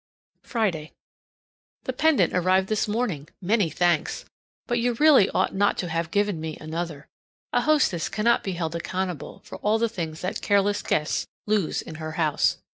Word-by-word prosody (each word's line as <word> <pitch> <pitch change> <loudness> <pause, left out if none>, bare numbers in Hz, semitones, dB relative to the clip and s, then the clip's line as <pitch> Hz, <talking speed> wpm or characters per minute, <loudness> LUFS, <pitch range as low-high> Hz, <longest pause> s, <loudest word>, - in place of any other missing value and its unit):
Friday. 185 -10 -2 0.9
The 260 - -3
pendant 315 +3 +3
arrived 185 +1 +2
this 215 -1 +1
morning. 205 - -2
Many 200 -1 +2
thanks! 170 -1 0 0.4
But 240 -1 0
you 240 +1 +1
really 275 -5 +6
ought - - 0
not 200 +1 +2
to 175 - -2
have 165 0 -1
given 205 -2 0
me 160 -1 -5
another; 155 -2 -5 0.5
a - - +3
hostess 290 - +2
cannot 230 +2 +2
be 190 - -2
held 165 -2 -3
accountable 180 -1 -4
for - - -9
all 210 +2 +2
the 230 +1 +1
things 165 -7 -5
that 185 - -3
careless 205 0 +2
guests 150 -1 0 0.2
lose 205 -5 0
in - - -9
her 155 0 -5
house. 155 -2 +1
185 Hz, 165 wpm, -25 LUFS, 165-215 Hz, 0.9 s, really